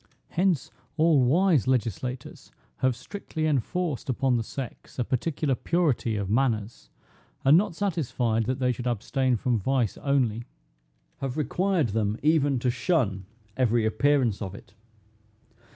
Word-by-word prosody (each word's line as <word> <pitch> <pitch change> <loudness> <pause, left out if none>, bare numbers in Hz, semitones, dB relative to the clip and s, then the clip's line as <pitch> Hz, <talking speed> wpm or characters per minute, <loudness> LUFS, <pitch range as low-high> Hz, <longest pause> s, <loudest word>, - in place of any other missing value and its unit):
Hence 180 -4 0 0.3
all 155 -4 +4
wise 155 - +3
legislators 125 0 -2 0.3
have 130 -2 +1
strictly 155 - -5
enforced 155 +1 -1
upon 130 0 +1
the 115 - +1
sex 130 +2 -8
a 125 - +1
particular 140 +3 -1
purity 140 -6 0
of 100 -2 -2
manners; 115 -1 -1 0.6
and 140 +3 +7
not 175 -1 +2
satisfied 125 - 0
that 130 +2 -1
they 125 -2 +1
should 125 0 -4
abstain 125 +3 0
from 120 -1 0
vice 125 0 0
only, 125 -5 0 0.7
have 135 0 -4
required 170 - +1
them 105 0 0
even 145 -3 +3
to 125 - +2
shun 120 - 0 0.3
every 120 -3 +2
appearance 120 -1 +2
of 95 -2 -5
it. 95 - -14
130 Hz, 135 wpm, -26 LUFS, 115-150 Hz, 0.7 s, and